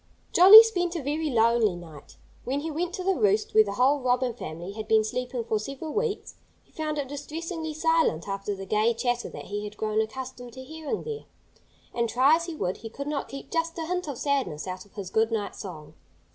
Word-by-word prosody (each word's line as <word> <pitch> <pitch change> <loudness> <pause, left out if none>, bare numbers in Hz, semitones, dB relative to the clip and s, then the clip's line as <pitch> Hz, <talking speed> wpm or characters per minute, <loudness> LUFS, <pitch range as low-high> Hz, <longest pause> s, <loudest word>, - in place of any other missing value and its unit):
Jolly 395 +6 +11
spent 355 -6 -1
a 325 - -3
very 300 +3 -1
lonely 230 -4 +3
night. 160 -4 -12 0.3
When 275 +3 -2
he 320 +1 -4
went 340 +3 -2
to 370 - -5
the 385 +1 +2
roost 210 - +1
where 220 - +7
the 200 -1 -5
whole 265 +6 +3
Robin 250 -1 +1
family 175 -5 -7
had 215 +1 -7
been 220 -1 +4
sleeping 245 +2 -3
for 220 -1 -1
several 275 +7 -6
weeks, 440 -1 -2 0.3
he - - -31
found 305 -1 -3
it 285 -2 -2
distressingly 315 +3 -5
silent, 325 - +1
after 200 +1 -3
the 195 0 -7
gay 215 +4 +2
chatter 245 0 -1
that - - -9
he 205 +1 -4
had 210 0 -8
grown 215 0 0
accustomed 245 +1 -6
to 260 - -9
hearing 315 +8 -5
there. 450 -1 -6 0.7
And 235 -1 0
try 260 +7 +5
as 335 - -5
he 335 - -5
would, 185 -10 -2
he 225 - -8
could 280 +5 -7
not 295 -1 -3
keep 275 - -9
just 330 0 -1
a 325 - -3
hint 360 0 -2
of 280 -4 -5
sadness 270 - -1
out 185 0 -6
of - - -29
his 195 -3 -6
good 220 +1 +2
night 210 -3 -2
song. 160 -7 -9
255 Hz, 220 wpm, -26 LUFS, 215-315 Hz, 0.7 s, Jolly